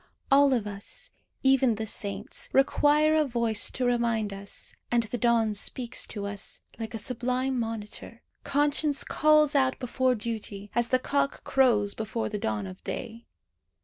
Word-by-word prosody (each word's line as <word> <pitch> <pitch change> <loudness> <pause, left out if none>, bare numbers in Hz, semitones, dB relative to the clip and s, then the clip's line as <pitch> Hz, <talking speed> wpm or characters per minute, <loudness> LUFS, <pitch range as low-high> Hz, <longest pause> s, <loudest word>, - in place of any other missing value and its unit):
All 280 0 +6
of 240 -5 +1
us, 200 -1 -7 0.3
even 265 -3 +4
the 220 +1 -4
saints, 205 -2 -4
require 295 +3 +4
a 310 -1 +4
voice 235 -5 +2
to 255 - -2
remind 235 -4 0
us; 200 +1 -6 0.2
and 240 -1 +2
the 225 +2 -4
dawn 230 -2 +2
speaks 235 +4 -1
to 205 -2 -5
us, 200 0 -4 0.2
like 225 0 -5
a - - -2
sublime 250 +2 -1
monitor. 225 0 -5 0.2
Conscience 290 0 +1
calls 305 -1 +4
out 265 -2 +2
before 255 0 0
duty, 210 -3 -5
as 240 0 +1
the 255 - +4
cock 280 +2 -1
crows 225 -7 +3
before 220 +1 -3
the 210 -1 -4
dawn 105 - -2
of 95 -1 -10
day. 230 -2 -6
235 Hz, 155 wpm, -27 LUFS, 215-265 Hz, 0.3 s, All